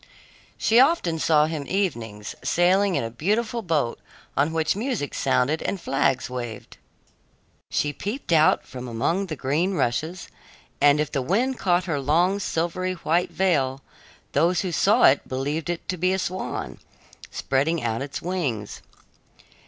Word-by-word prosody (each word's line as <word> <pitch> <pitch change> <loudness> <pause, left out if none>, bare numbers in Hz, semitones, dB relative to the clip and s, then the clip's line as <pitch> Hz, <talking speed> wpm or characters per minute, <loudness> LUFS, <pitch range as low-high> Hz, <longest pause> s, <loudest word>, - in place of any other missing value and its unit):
She 225 +2 +4
often 255 - +3
saw 150 -1 +4
him 155 -3 -4
evenings, 115 - -2
sailing 185 +2 +3
in - - 0
a 115 - -4
beautiful 220 - -1
boat 155 - -1 0.4
on 145 +3 +2
which 160 +1 0
music 220 - -2
sounded 135 +3 +1
and 200 - -2
flags 135 -4 0
waved. 120 -4 -7 0.9
She 145 0 0
peeped 205 - -5
out 160 -1 +4
from 125 -1 -8
among 165 +12 -1
the 155 - -4
green 155 +8 0
rushes, 160 +7 -1 0.5
and 145 0 +5
if 150 -1 -1
the 140 - -1
wind 235 - 0
caught 180 -1 +2
her 160 -5 -2
long 170 +8 +2
silvery 185 0 -1
white 170 0 0
veil, 140 -8 0 0.5
those 170 +4 +2
who 185 - -3
saw 210 +8 +3
it 135 - +5
believed 145 +6 -2
it 175 -1 -4
to 185 - -1
be 185 +2 +1
a - - +1
swan, 185 0 -4 0.5
spreading 145 +4 0
out 115 0 -1
its 140 0 -5
wings. 145 - -3
160 Hz, 150 wpm, -24 LUFS, 135-185 Hz, 0.9 s, and